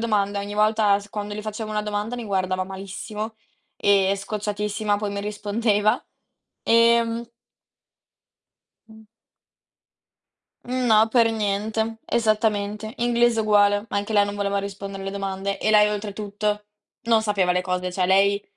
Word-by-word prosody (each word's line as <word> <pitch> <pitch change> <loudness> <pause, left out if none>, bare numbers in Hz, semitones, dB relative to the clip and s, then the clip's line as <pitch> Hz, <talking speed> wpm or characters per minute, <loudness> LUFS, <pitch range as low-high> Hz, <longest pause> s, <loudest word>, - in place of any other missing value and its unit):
domanda. 205 -3 0
Ogni 205 +1 -6
volta 210 -1 +3
s 200 - -13
quando 205 0 -5
le 210 - -4
facevo 215 0 -5
una 210 0 0
domanda 210 +3 -3
mi 240 - -5
guardava 185 -2 -1
malissimo 205 +3 -6 0.4
e 200 -1 +3
scocciatissima 210 0 -2
poi 205 -1 -3
mi 200 - -3
rispondeva, 210 +1 0 0.6
ehm 230 0 +3 1.6
Mh. 220 0 -16 1.6
Mh, 255 0 -2
no, 220 0 +5
per 230 -2 +4
niente, 220 +1 -1
esattamente. 215 -1 0
Inglese 240 -1 +2
uguale, 205 -1 +3
anche 205 +2 -2
lei 205 -1 +5
non 205 - -4
voleva 200 0 -1
rispondere 195 0 -6
alle 195 - -4
domande, 195 0 -3
e 215 - +1
lei 210 -1 +6
oltretutto 210 0 -3 0.4
non 230 -2 +3
sapeva 195 -4 +1
le 180 - +1
cose, 180 0 -2
cioè 180 -1 0
lei 200 +2 +3
210 Hz, 135 wpm, -23 LUFS, 200-220 Hz, 1.6 s, lei